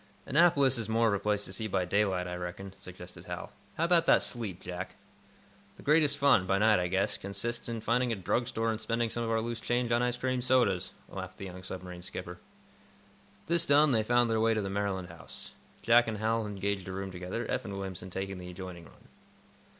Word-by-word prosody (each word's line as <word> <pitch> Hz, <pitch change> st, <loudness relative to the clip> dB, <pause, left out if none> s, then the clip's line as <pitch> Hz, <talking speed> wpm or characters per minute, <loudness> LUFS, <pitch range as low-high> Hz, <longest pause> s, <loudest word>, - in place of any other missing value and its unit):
"Annapolis 140 Hz, -5 st, +4 dB
is 110 Hz, -2 st, -3 dB
more 115 Hz, +1 st, +3 dB
of -, -, +1 dB
a 100 Hz, -, 0 dB
place 105 Hz, 0 st, 0 dB
to 95 Hz, -, -9 dB
see 110 Hz, +3 st, -3 dB
by 95 Hz, -3 st, 0 dB
daylight, 95 Hz, -1 st, +1 dB
I 90 Hz, -, -4 dB
reckon," 90 Hz, +2 st, -6 dB
suggested 90 Hz, -1 st, -11 dB
Hal. -, -, -6 dB, 0.3 s
"How 160 Hz, -, +1 dB
about 170 Hz, -1 st, +4 dB
that -, -, +6 dB
sleep, 105 Hz, -7 st, -3 dB
Jack?" 90 Hz, +1 st, -6 dB, 0.8 s
"The -, -, -13 dB
greatest 150 Hz, -1 st, +4 dB
fun, 140 Hz, -10 st, +4 dB
by 95 Hz, -, +3 dB
night, 105 Hz, 0 st, +5 dB
I 90 Hz, -, 0 dB
guess, 95 Hz, +2 st, 0 dB
consists 115 Hz, +5 st, -3 dB
in 115 Hz, -1 st, -3 dB
finding 120 Hz, +2 st, +1 dB
a -, -, +1 dB
drug 115 Hz, +5 st, 0 dB
store 115 Hz, -2 st, 0 dB
and 110 Hz, 0 st, -4 dB
spending 115 Hz, 0 st, 0 dB
some 120 Hz, -, -2 dB
of 115 Hz, -, -2 dB
our 115 Hz, 0 st, +2 dB
loose 115 Hz, 0 st, -4 dB
change 120 Hz, 0 st, 0 dB
on 120 Hz, +1 st, +3 dB
ice 125 Hz, 0 st, 0 dB
cream 130 Hz, 0 st, -1 dB
sodas," 120 Hz, -8 st, +2 dB
laughed -, -, -7 dB
the 100 Hz, -, -6 dB
young 90 Hz, 0 st, -8 dB
submarine 90 Hz, -1 st, -7 dB
skipper. 90 Hz, 0 st, -7 dB, 1.1 s
This 170 Hz, +1 st, +3 dB
done, 145 Hz, -1 st, +5 dB
they 115 Hz, -3 st, +3 dB
found 120 Hz, +1 st, +3 dB
their 110 Hz, -1 st, +2 dB
way 115 Hz, 0 st, +3 dB
to 110 Hz, -, 0 dB
the 95 Hz, -, -3 dB
Maryland 100 Hz, -3 st, -2 dB
House. 85 Hz, -2 st, -9 dB, 0.3 s
Jack 120 Hz, 0 st, +6 dB
and 110 Hz, -1 st, -2 dB
Hal 110 Hz, +1 st, 0 dB
engaged 100 Hz, -1 st, -2 dB
a -, -, -4 dB
room 95 Hz, 0 st, -4 dB
together, 90 Hz, +5 st, -4 dB
Eph 130 Hz, -1 st, -2 dB
and 100 Hz, -2 st, -5 dB
Williamson 95 Hz, -2 st, -6 dB
taking 95 Hz, +1 st, -4 dB
the 90 Hz, 0 st, -8 dB
adjoining 90 Hz, -2 st, -8 dB
one. -, -, -19 dB
105 Hz, 220 wpm, -30 LUFS, 95-120 Hz, 1.1 s, that